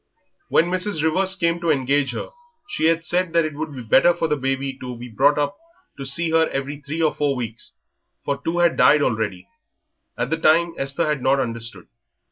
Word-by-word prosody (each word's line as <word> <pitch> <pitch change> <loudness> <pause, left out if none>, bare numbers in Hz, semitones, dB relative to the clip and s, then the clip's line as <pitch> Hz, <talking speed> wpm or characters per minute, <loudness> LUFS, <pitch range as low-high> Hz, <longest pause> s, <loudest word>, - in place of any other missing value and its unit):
When 165 - +4
Mrs. 185 -3 0
Rivers 185 +4 +3
came 170 -2 0
to 170 -1 -2
engage 140 -1 +1
her - - -5 0.4
she 410 - -2
had 165 0 +2
said 175 0 0
that 165 -1 +3
it 155 - -4
would 155 +1 -5
be 125 - -7
better 170 +10 +4
for 165 - -1
the 150 - +1
baby 135 0 -2
to 125 -1 -6
be 120 +1 -9
brought 135 +6 +3 0.6
to 135 - -7
see 165 +4 +2
her 160 0 +3
every 140 +1 -4
three 150 +3 -4
or 155 - +2
four 145 -2 0
weeks, 115 -3 -6 0.5
for 140 -1 -2
two 165 +1 -2
had 175 -1 +2
died 145 +4 +5
already. 105 -7 -2 0.7
At 125 +4 -2
the 160 - +1
time 165 +1 +3
Esther 140 +4 -2
had 150 -3 -1
not 135 +2 +2
understood. 115 -2 -3
150 Hz, 200 wpm, -22 LUFS, 135-165 Hz, 0.7 s, died